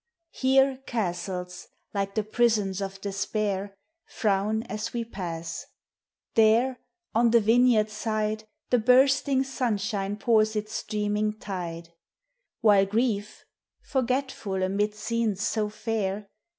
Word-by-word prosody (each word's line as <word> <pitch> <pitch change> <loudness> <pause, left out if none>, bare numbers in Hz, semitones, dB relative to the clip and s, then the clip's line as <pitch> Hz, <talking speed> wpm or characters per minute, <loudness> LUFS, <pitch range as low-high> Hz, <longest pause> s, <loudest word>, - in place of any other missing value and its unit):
Here 265 0 +3
castles, 180 -4 -3 0.3
like 195 -1 -2
the 215 - +1
prisons 215 -3 +1
of 195 0 -5
despair, 200 0 -2 0.3
Frown 215 +1 0
as 210 +2 -5
we 235 -1 -2
pass;— 170 -6 -5 0.7
there, 230 +4 +4 0.3
on 235 +1 +4
the 235 +1 +6
vineyards 225 -1 +4
side, 215 0 -2 0.3
The 245 - +5
bursting 265 +3 +4
sunshine 210 -6 -2
poms 220 0 +3
its 215 +1 -3
si 210 -1 -1
learning 210 +1 0
tide; 170 -4 -5 0.7
While 200 -3 +5
Grief, 210 -1 -1 0.4
forgetful 255 -7 -1
amid 205 +3 0
scenes 215 -2 -1
so 215 -2 0
fair. 210 -2 -3
215 Hz, 110 wpm, -27 LUFS, 195-230 Hz, 0.7 s, the